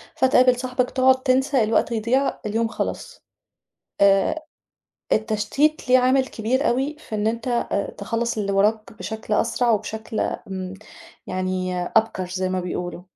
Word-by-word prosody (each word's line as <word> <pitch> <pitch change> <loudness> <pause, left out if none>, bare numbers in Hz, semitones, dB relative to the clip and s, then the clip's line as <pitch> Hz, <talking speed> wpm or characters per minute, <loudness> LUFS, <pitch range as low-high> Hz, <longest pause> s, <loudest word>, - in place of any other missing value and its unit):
فتقابل 255 -1 +4
صاحِبك، 250 0 -1
تُقعد 260 0 +3
تنسى 265 -1 +2
الوقت 220 +2 +1
يضيع 235 +5 +1
اليوم 225 +2 0
خلَص. 225 - -5 0.8
آآ 200 +10 +3 0.7
التشتيت 220 +8 +1
ليه 255 +1 +6
عامل 260 +1 +3
كبير 260 +6 0
أوي، 270 +5 0
في 270 - -9
إن 210 0 -1
أنت 235 +2 -1 0.3
تخلّص 230 +3 -2
اللي 200 -1 -1
وراك 215 +2 +1
بشكل 220 0 -4
أسرع، 235 +2 +1
وبشكل 220 0 -2
امم 190 -2 -4 0.5
يعني 185 -1 -2
أبكر 190 -1 0
زي 185 0 -2
ما 185 0 -1
بيقولوا. 180 0 -5
225 Hz, 130 wpm, -23 LUFS, 200-255 Hz, 0.8 s, ليه